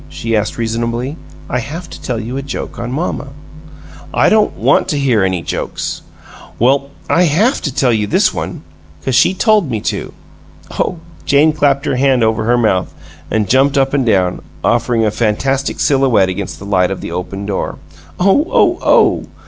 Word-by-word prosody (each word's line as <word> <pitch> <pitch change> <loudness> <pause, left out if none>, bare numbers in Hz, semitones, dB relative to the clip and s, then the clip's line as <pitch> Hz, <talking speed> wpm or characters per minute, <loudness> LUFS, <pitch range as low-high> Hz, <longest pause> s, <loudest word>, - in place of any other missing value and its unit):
she 115 0 -2
asked, 105 0 -1
reasonably. 115 +4 -2 0.3
"I 125 - -1
haf 160 +8 -6
to - - -10
tell 120 -3 -3
you 115 +3 -5
a 135 - -2
joke 140 0 -6
on 120 +1 -4
mamma." 145 0 -3 0.8
"I - - +3
don't 215 -1 +2
want - - +2
to 150 - -1
hear 125 -7 +2
any 95 -3 -1
jokes!" - - -4 0.6
"Well, 135 +3 +2 0.2
I 180 +2 +3
HAF 200 - +2
to 140 -4 -4
tell 125 -3 +2
you 105 -2 0
this - - +2
one - - -5 0.4
'cause 130 - 0
she 170 +9 +4
told 210 - +2
me 110 -3 -1
to! - - -3 0.6
Oh!" 180 - -2 0.3
Jane 145 +3 +3
clapped 140 -2 +1
her - - 0
hand 130 -2 +3
over 110 0 +1
her 120 +2 +3
mouth 105 -6 0 0.3
and 110 -2 0
jumped 135 +5 +3
up 135 0 +2
and 140 -2 +2
down, 95 -6 +1 0.2
offering 115 -1 +1
a 105 - +1
fantastic 135 +6 -1
silhouette 130 -9 +3
against 95 +1 -4
the 100 - -10
light 95 -3 +2
of 95 - -4
the - - -6
Open 95 +3 -5
door. 100 -1 -3 0.4
"Oh, 200 - +3
oh, - - +3
OH!" - - +3
125 Hz, 180 wpm, -15 LUFS, 110-140 Hz, 0.8 s, she